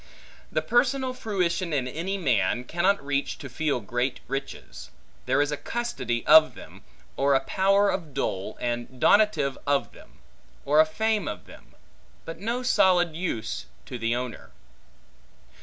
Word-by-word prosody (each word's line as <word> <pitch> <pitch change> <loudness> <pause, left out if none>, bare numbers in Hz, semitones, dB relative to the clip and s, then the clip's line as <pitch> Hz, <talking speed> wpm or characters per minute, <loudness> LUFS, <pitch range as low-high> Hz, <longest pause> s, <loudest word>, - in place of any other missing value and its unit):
The - - 0
personal 255 +1 +1
fruition 185 -6 -1
in 130 -3 0
any 170 +9 -3
man, 120 - +1
cannot 175 +3 0
reach 140 0 -1
to 140 - -8
feel 140 +1 -1
great 120 +4 -2
riches: 65 - -6 0.4
there 145 - +3
is 145 - -3
a 150 - -2
custody 130 - -3
of 155 0 +7
them; - - -13 0.4
or 140 0 +3
a - - +4
power 195 +4 +3
of 165 -5 -4
dole, 105 -7 -3
and 120 +1 -4
donative 205 - +3
of 140 -1 +1
them; - - -17 0.5
or 150 +2 +3
a 155 - +6
fame 215 +1 0
of 105 - -6
them; - - -16 0.5
but 165 - -7
no 235 +5 -2
solid 180 -9 +3
use 120 -11 -4 0.2
to 125 -3 -7
the 115 +1 0
owner. 125 -2 -5
150 Hz, 150 wpm, -26 LUFS, 125-195 Hz, 0.5 s, of